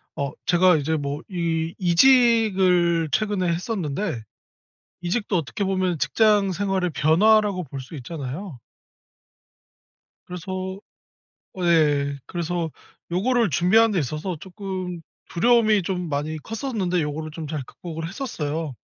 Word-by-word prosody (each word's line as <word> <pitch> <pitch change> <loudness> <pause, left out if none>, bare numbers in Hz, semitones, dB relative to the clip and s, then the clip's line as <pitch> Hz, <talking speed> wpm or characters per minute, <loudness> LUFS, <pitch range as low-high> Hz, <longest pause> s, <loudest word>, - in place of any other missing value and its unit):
어 140 0 -2
제가 180 0 +5
이제 160 +2 -1
뭐 145 +1 -3
이 165 -3 -1
이직을 185 - +4
최근에 205 -4 0
했었는데 170 - -2 0.8
이직도 190 +3 -1
어떻게 165 +6 -3
보면 185 -4 0
직장 205 +7 +3
생활의 190 -2 -1
변화라고 185 +7 +3
볼 140 -1 -8
수 135 +5 -10
있잖아요. 145 +2 -6 1.7
그래서 185 +2 -5 0.8
어 185 - -4
예. 145 -4 +3
그래서 170 -1 -3 0.4
요거를 230 +5 +2
준비하는 220 +6 +4
데 185 - +1
있어서 155 +5 -3
조금 185 -2 -6 0.3
두려움이 215 +1 +4
좀 180 -1 -3
많이 150 +2 -2
컸었는데 210 - -2
요거를 155 +1 -4
좀 155 0 -7
잘 150 -2 -4
극복을 165 +3 -7
했었어요. 160 - -4
175 Hz, 265 characters per minute, -23 LUFS, 155-195 Hz, 1.7 s, 제가